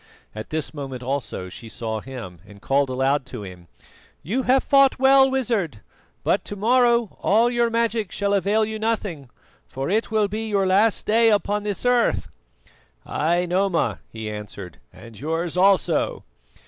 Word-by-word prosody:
At 110 0 -8
this 155 0 -3
moment 135 -4 -6
also 130 -8 -3
she 110 +5 -10
saw 110 -1 -4
him 115 -10 -9
and 100 -1 -14
called 135 +5 +1
aloud 135 +2 +1
to 125 -5 -7
him: 90 -3 -11 0.6
"You 230 - -1
have 260 +1 +3
fought 275 -1 +4
well, 270 +1 +5
Wizard, 220 - -1 0.4
but - - +1
to 205 - -6
morrow 235 +1 +2
all 230 +4 +3
your 240 -1 +1
magic 230 -3 -1
shall 200 0 -1
avail 205 +3 +2
you 220 0 -5
nothing, 205 - -2 0.4
for 135 +6 -4
it 220 +3 0
will 215 -2 +2
be 220 +2 -4
your 200 -2 +1
last 200 +4 +2
day 225 +1 +4
upon 210 0 +1
this 205 +1 -3
earth." 245 -1 +2 0.8
"Ay, 170 +4 0
Noma," 175 - 0
he 110 -1 -6
answered, 105 -4 -8
"and 115 -2 -14
yours 165 +3 -2
also." 180 -4 +2
190 Hz, 160 wpm, -23 LUFS, 130-225 Hz, 0.8 s, well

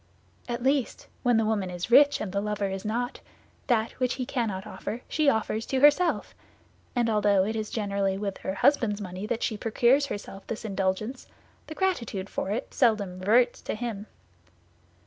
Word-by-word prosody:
At 240 0 -3
least, 270 -1 0 0.2
when 245 -3 +3
the 225 - +2
woman 210 -4 0
is 180 +5 -5
rich 285 +3 +7
and 205 - -3
the 200 +1 -1
lover 210 -1 -1
is 195 0 -4
not, 240 +3 -2 0.5
that 230 -3 +2
which 255 -1 +1
he 255 - -3
cannot 220 -7 -2
offer 220 +2 -6
she 305 -2 +2
offers 220 -2 0
to 265 - 0
herself; 295 +6 +4 0.6
and 240 -1 +2
although 205 -3 +3
it 220 +2 -2
is 215 -1 -3
generally 200 -3 -1
with 200 -1 -4
her 190 - -3
husband's 235 -3 +2
money 190 +1 -6
that 230 +1 -2
she 215 - -1
procures 240 +6 +3
herself 200 -4 -7
this 225 0 -5
indulgence, 200 +5 -2 0.4
the 315 - -7
gratitude 235 - -1
for - - -3
it 225 +6 -3
seldom 205 -7 +1
reverts 240 +6 +3
to - - -4
him. 215 -2 -5
220 Hz, 175 wpm, -27 LUFS, 200-245 Hz, 0.6 s, rich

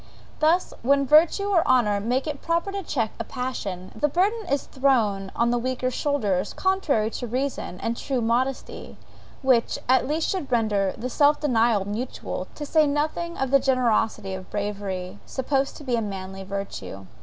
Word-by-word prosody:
Thus 325 +4 +2
when 275 +3 +3
virtue 315 +8 +5
or 385 -5 +4
honour 210 -6 +3
make 245 +6 0
it 295 -3 -4
proper 335 +4 0
to 395 0 -3
check 235 - -1
a - - -1
passion, 210 -8 -5
the 260 +7 +2
burden 395 +7 0
is 280 -4 0
thrown 220 -8 +1
on 235 0 +2
the 240 - +1
weaker 255 +1 -1
shoulders, 210 -10 0
contrary 315 - +1
to 245 - -5
reason 255 -6 -3
and 230 - -1
true 265 +1 -2
modesty, 245 +3 -2 0.5
which, 255 -3 +3
at 255 0 +4
least, 315 +2 0
should 365 -8 -3
render 210 -5 +1
the 240 - -3
self 290 +3 +3
denial 230 -7 +2
mutual, 220 +6 -4
to 295 - -5
say 310 +1 +3
nothing 310 +4 -1
of 270 -1 -1
the 275 - +6
generosity 235 -7 +1
of 190 0 -7
bravery, 200 -2 -4
supposed 270 +1 -1
to - - -11
be 255 -3 0
a 230 - 0
manly 195 -2 -5
virtue. 190 - -6
255 Hz, 170 wpm, -25 LUFS, 210-290 Hz, 0.5 s, the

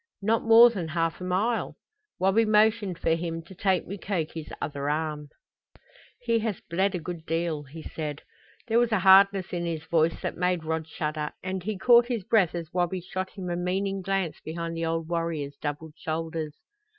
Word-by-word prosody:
"Not 220 +2 +2
more 230 +1 +8
than 185 -7 -4
half 165 +1 -1
a - - -4
mile." 200 +6 0 0.4
Wabi 195 +4 +3
motioned 215 -3 +3
for 165 - 0
him 165 0 -3
to 165 - -13
take 190 -1 +1
Mukoki's 170 -5 -4
other 140 -1 -3
arm. 150 -1 -2 0.9
"He 230 -2 +1
has 220 -3 -2
bled 190 +4 0
a - - -2
good 170 0 -6
deal," 165 -2 -1
he 155 +4 -10
said. 150 -2 -5 0.4
There 230 0 +3
was 240 -1 +2
a 215 -4 +2
hardness 195 0 +6
in 175 -1 -2
his 160 -2 -3
voice 165 0 +1
that - - -2
made 180 -1 0
Rod 160 0 -2
shudder, 150 -1 -3
and 185 0 -3
he 205 +2 -3
caught 240 +3 +6
his 235 -5 -2
breath 190 -4 +2
as 170 -1 -6
Wabi 180 0 0
shot 185 +1 -4
him 190 -3 -7
a - - -1
meaning 190 +2 -1
glance 190 -3 -1
behind 165 +1 -5
the 165 0 -2
old 165 0 -2
warrior's 165 -4 -2
doubled 150 +1 -4
shoulders. 160 -1 -4
175 Hz, 185 wpm, -27 LUFS, 160-195 Hz, 0.9 s, more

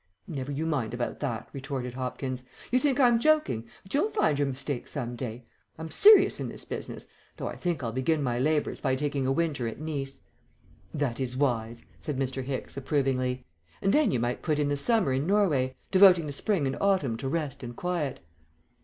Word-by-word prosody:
"Never 140 -3 -5
you 145 +3 -2
mind 130 -8 -1
about 120 0 -3
that," 115 -2 -3
retorted 130 -2 -4
Hopkins; 130 0 -4 0.3
"you 255 - +4
think 285 -1 +1
I'm 240 -3 +5
joking, 300 - +2 0.2
but 190 - -9
you'll 300 +10 +2
find 155 - +1
your 145 - +2
mistake 135 -1 -3
some 125 -4 -3
day. 120 -1 -6 0.3
I'm 160 0 -7
serious 425 0 +7
in - - -3
this - - -7
business, - - -6 0.3
though - - -5
I - - -5
think 175 -6 -2
I'll 115 - -2
begin 140 +5 0
my 120 -2 0
labours 150 +3 0
by 130 -2 +1
taking 140 -1 -1
a - - +2
winter 140 -5 0
at 115 - -6
Nice." 140 -3 -4 0.7
"That 135 -4 -2
is 130 -1 -2
wise," 115 -4 -1
said 145 -3 -4
Mr. 130 0 -2
Hicks, 130 0 -4
approvingly; 130 -3 0 0.3
"and 195 - +1
then 300 -1 +4
you 125 - +1
might 120 +1 -1
put 155 -3 0
in 145 -1 +1
the 145 - +1
summer 175 - +2
in 135 +4 0
Norway, 155 -11 +2 0.2
devoting 185 -4 +7
the 145 - -4
spring 165 +2 0
and 135 - -1
autumn 185 -12 +2
to 135 +2 -3
rest 150 -3 -2
and 120 -2 -7
quiet." 170 -5 -2
140 Hz, 200 wpm, -28 LUFS, 130-165 Hz, 0.7 s, serious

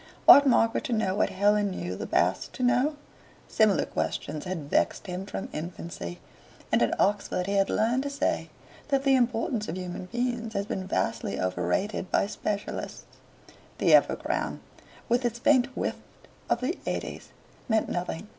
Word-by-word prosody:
Ought 285 0 +10
Margaret 230 -3 +3
to 245 - -1
know 215 -4 +1
what 205 - +1
Helen 205 +1 +2
knew 90 - -4
the - - -5
Basts 90 +3 +1
to 255 - -4
know? 250 +5 +2 0.5
Similar 215 -3 +3
questions 155 - -3
had 175 -6 -4
vexed - - +1
him 185 +1 -5
from 195 - -5
infancy, 155 - -6 0.5
and - - +3
at - - +1
Oxford 200 -2 +1
he 200 - -2
had 195 -1 +2
learned 235 +4 +1
to 285 - -3
say 280 - -1 0.4
that 275 -2 +1
the 275 -1 +4
importance 235 -2 0
of 165 - -4
human 180 0 -5
beings 240 +1 -2
has 200 0 0
been 190 -2 -4
vastly 115 - -1
overrated 95 - -1
by - - +2
specialists. 205 0 -4 0.7
The - - +3
epigram, - - +2 0.5
with 240 +2 +2
its 240 -1 -1
faint 255 +1 +4
whiff - - -1 0.5
of 235 - +1
the 285 +8 -2
eighties, - - -4 0.4
meant 220 -1 +2
nothing. 175 +2 -4
205 Hz, 160 wpm, -27 LUFS, 180-240 Hz, 0.7 s, Ought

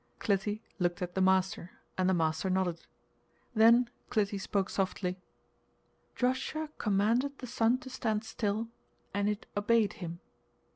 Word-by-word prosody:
Clytie 205 +1 0 0.2
looked 175 +1 0
at 175 0 -4
the 190 - 0
master, 190 -1 +2 0.2
and 185 0 +2
the 190 - +3
master 160 +2 0
nodded. 185 -3 -1 0.7
Then 230 +2 +6 0.2
Clytie 205 -2 0
spoke 195 -1 -1
softly: 190 -1 -1 1.0
"Joshua 260 +5 -1
commanded 230 +8 +2
the - - -7
sun 235 0 +2
to 260 - -9
stand 220 -4 -1
still, 220 0 -2 0.4
and 200 +1 +1
it 210 0 -3
obeyed 210 +1 +3
him!" 170 -2 -6
205 Hz, 135 wpm, -31 LUFS, 185-225 Hz, 1.0 s, Then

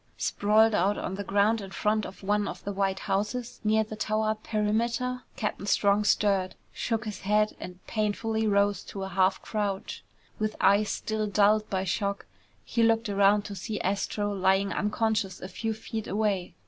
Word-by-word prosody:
Sprawled 215 +2 +3
on 195 -1 0
the 200 +1 -4
ground 205 +3 +2
in 195 - -7
front 210 +2 0
of 190 - -13
one 205 +1 +1
of - - -7
the 200 - -3
white 195 -1 -1
houses 210 +5 -2
near 220 0 +3
the 215 0 -8
tower 215 0 0
perimeter, 230 +4 -1
Captain 210 -2 -3
Strong 205 +1 +3
stirred, 195 -3 +2 0.2
shook 225 -1 -2
his 210 -1 -5
head, 210 +2 +1
and 180 0 -9
painfully 220 +1 -1
rose 200 0 +2
to 195 - -6
a 190 - -4
half 190 +1 +1
crouch. 205 -3 -3 0.4
With 215 0 -1
eyes 205 +1 +4
still 215 -1 -2
dulled 210 +1 +3
by 190 -1 -1
shock, 200 +2 -2 0.4
he 235 - 0
looked 225 -1 +3
around 200 +1 +4
to 205 - -6
see 210 +3 -4
Astro 205 +2 -1
lying 195 +1 +2
unconscious 215 -2 0
a 185 - -6
few 225 +4 -3
feet 220 0 -6
away. 195 -4 -1
210 Hz, 170 wpm, -28 LUFS, 195-215 Hz, 0.4 s, eyes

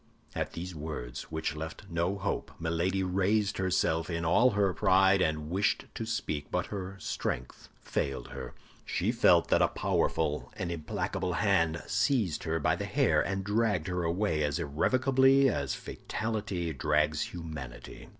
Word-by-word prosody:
At - - -3
these 90 +2 -5
words, 75 -6 -6
which 80 -1 -2
left 80 +1 -6
no 85 +4 -1
hope, 100 +1 -3
Milady 85 +4 0
raised 95 +3 +1
herself 85 -3 +1
in 85 -1 -2
all 115 +10 +5
her 100 -2 +3
pride, 95 +1 +4
and 75 -1 -1
wished 100 +3 +1
to 115 - -5
speak; 75 -10 -3
but 90 -1 0
her 95 -1 -5
strength 60 -8 -4
failed 70 -1 -2
her. 65 -2 -7 0.3
She - - 0
felt - - +4
that - - +4
a - - +5
powerful 75 -2 0
and 90 -2 -3
implacable 85 +2 -2
hand 85 -6 +2
seized 105 - +1
her 80 0 0
by - - +2
the - - -4
hair, - - +3
and 95 0 -2
dragged 105 -4 +1
her 90 0 -1
away 85 -1 0
as 75 -1 0
irrevocably 130 - +3
as 70 - -1
fatality 105 -7 -3
drags 75 +2 +1
humanity. 75 -8 -8
85 Hz, 150 wpm, -30 LUFS, 80-100 Hz, 0.3 s, all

